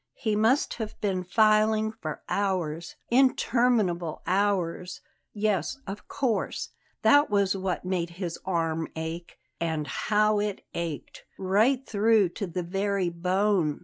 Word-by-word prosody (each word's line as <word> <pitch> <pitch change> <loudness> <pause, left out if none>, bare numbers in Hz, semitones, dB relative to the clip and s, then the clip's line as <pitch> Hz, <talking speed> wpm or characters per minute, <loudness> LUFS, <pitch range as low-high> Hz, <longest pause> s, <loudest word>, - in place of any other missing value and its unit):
He 215 -3 -1
must 225 +7 +2
have 215 - -6
been 190 -3 -1
filing 215 +2 +3
for 165 -9 -7
hours, 175 -5 -2 0.2
interminable 235 - +2
hours 185 -1 0 0.3
yes, 210 +3 -1
of 195 +1 -7
course, 250 -5 -1 0.3
that 290 +1 +5
was 200 -2 +2
what 185 -2 -3
made 180 -2 -1
his 175 -3 -4
arm 165 -3 -1
ache 160 +2 -6 0.2
And 160 -2 -1
how 210 +7 +1
it 205 -1 -3
ached; 170 -3 -5
right 220 +8 +2
through 215 -2 +3
to 200 +3 -5
the 180 +1 -3
very 195 +1 0
bone! 180 -2 +1
195 Hz, 125 wpm, -27 LUFS, 170-215 Hz, 0.3 s, that